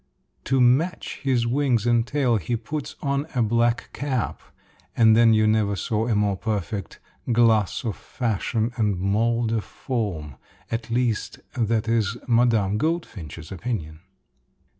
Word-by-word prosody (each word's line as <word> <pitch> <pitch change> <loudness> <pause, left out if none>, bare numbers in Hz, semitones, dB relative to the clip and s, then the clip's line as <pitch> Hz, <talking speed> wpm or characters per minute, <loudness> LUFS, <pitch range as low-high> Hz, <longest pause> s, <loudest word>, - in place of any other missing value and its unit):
To 135 -1 +2
match 135 +8 +2
his 130 -4 +1
wings 125 -2 +1
and 120 -1 +2
tail, 130 -4 +2
he 105 +5 -2
puts 135 +6 -5
on 140 +1 0
a 120 - +3
black 115 +1 +1
cap, 130 -5 -2 0.6
and 110 -2 +6
then 115 0 +6
you 110 0 +4
never 110 -2 +2
saw 110 +3 -1
a 115 - +1
more 105 -1 +2
perfect 100 -1 -4 0.3
"glass 115 -3 +3
of 110 - -2
fashion 115 0 -2
and 105 -4 +1
mold 110 +5 +1
of 110 -2 0
form" 90 - -4 0.3
at 115 0 -3
least 115 -2 -1
that 115 -3 0
is 115 -1 +1
Mme. 115 -4 +3
Goldfinch's 95 - -3
opinion. 85 -6 -4
115 Hz, 140 wpm, -24 LUFS, 105-120 Hz, 0.6 s, and